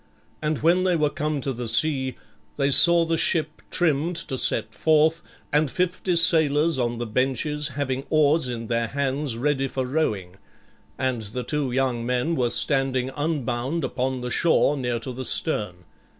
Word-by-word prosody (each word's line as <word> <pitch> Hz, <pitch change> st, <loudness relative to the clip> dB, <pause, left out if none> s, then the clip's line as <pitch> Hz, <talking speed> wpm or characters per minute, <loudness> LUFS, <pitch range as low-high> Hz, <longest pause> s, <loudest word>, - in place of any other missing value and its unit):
And 150 Hz, -1 st, -2 dB
when 175 Hz, +3 st, +3 dB
they 185 Hz, -1 st, +2 dB
were 150 Hz, -2 st, +1 dB
come 150 Hz, -1 st, -3 dB
to 135 Hz, 0 st, -3 dB
the 120 Hz, 0 st, -6 dB
sea, 130 Hz, +2 st, +1 dB, 0.4 s
they 140 Hz, -1 st, 0 dB
saw 170 Hz, +4 st, +7 dB
the 165 Hz, 0 st, -1 dB
ship 155 Hz, -2 st, 0 dB
trimmed 165 Hz, 0 st, 0 dB
to 165 Hz, -5 st, -2 dB
set 110 Hz, -3 st, 0 dB
forth, 155 Hz, +7 st, +2 dB, 0.3 s
and 150 Hz, 0 st, +2 dB
fifty 180 Hz, +2 st, -1 dB
sailors 160 Hz, -3 st, +4 dB
on 120 Hz, -1 st, -1 dB
the 120 Hz, -, -4 dB
benches 135 Hz, +6 st, -1 dB
having 135 Hz, -1 st, -2 dB
oars 155 Hz, -2 st, +3 dB
in 115 Hz, -1 st, -5 dB
their 115 Hz, 0 st, -1 dB
hands 140 Hz, -1 st, -2 dB
ready 135 Hz, +1 st, 0 dB
for 130 Hz, 0 st, -3 dB
rowing; 105 Hz, -, -2 dB, 0.6 s
and 130 Hz, -3 st, -1 dB
the 110 Hz, +4 st, -6 dB
two 145 Hz, -3 st, -2 dB
young 125 Hz, -2 st, -1 dB
men 125 Hz, +7 st, -1 dB
were 125 Hz, -5 st, 0 dB
standing 135 Hz, -1 st, 0 dB
unbound 145 Hz, -1 st, -2 dB
upon 130 Hz, 0 st, -2 dB
the 125 Hz, 0 st, -5 dB
shore 160 Hz, -2 st, +2 dB
near 125 Hz, -3 st, -2 dB
to 130 Hz, +3 st, -6 dB
the 130 Hz, +2 st, -6 dB
stern. 105 Hz, -, -2 dB
135 Hz, 165 wpm, -24 LUFS, 125-155 Hz, 0.6 s, saw